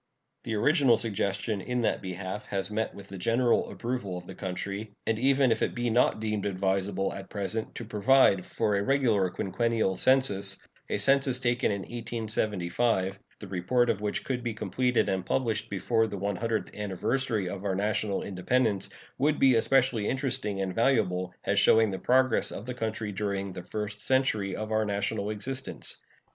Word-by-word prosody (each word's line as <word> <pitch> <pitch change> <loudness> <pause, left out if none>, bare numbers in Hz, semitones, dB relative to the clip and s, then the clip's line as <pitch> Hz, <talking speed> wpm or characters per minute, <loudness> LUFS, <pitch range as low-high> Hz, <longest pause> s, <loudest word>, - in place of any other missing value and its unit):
The 115 - -2
original 135 0 +4
suggestion 100 -1 -1
in 125 +4 -2
that 115 - 0
behalf 95 +2 -5
has 100 +1 -2
met 110 +1 -2
with 100 -1 -11
the 95 -1 -7
general 115 +5 +2
approval 115 -7 -3
of 90 - -9
the 95 - -9
country; 100 +3 -5
and 110 -1 0
even 135 0 +3
if 110 - +1
it - - 0
be 120 -1 -1
not 120 -1 +3
deemed 105 -2 -2
advisable 95 0 -1
at 95 -1 -8
present 105 +2 -3
to 115 - -6
provide 105 -2 +4
for 105 +1 -1
a 100 - +1
regular 115 -8 +2
quinquennial 100 +2 0
census, 100 -8 +3 0.3
a - - 0
census 135 +3 +5
taken 120 -3 +1
in 100 -1 -2
1875, 110 -3 -1 0.2
the 105 - -8
report 100 +7 +1
of 105 - -4
which 105 -1 -2
could 125 -2 -2
be 115 -2 -3
completed 125 +2 0
and 95 -1 -1
published 110 +2 -1
before 110 +3 +1
the 100 - -5
one 100 +1 -2
hundredth 115 -1 -2
anniversary 105 +2 -1
of 95 +1 -5
our 100 -2 -1
national 105 0 -1
independence, 100 +2 0 0.3
would 150 +3 +2
be 135 -1 +5
especially 120 -2 +2
interesting 130 -7 -1
and 95 -1 -2
valuable, 95 -7 +1
as - - +2
showing 110 -2 +5
the 95 - -4
progress 130 -1 +3
of 100 - -7
the 125 - -4
country 110 -3 -3
during 100 -1 -2
the 90 - -6
first 105 +3 -5
century 110 -8 +1
of 110 0 -5
our 110 0 +2
national 100 0 -2
existence. 130 +5 -4
110 Hz, 175 wpm, -28 LUFS, 100-120 Hz, 0.3 s, census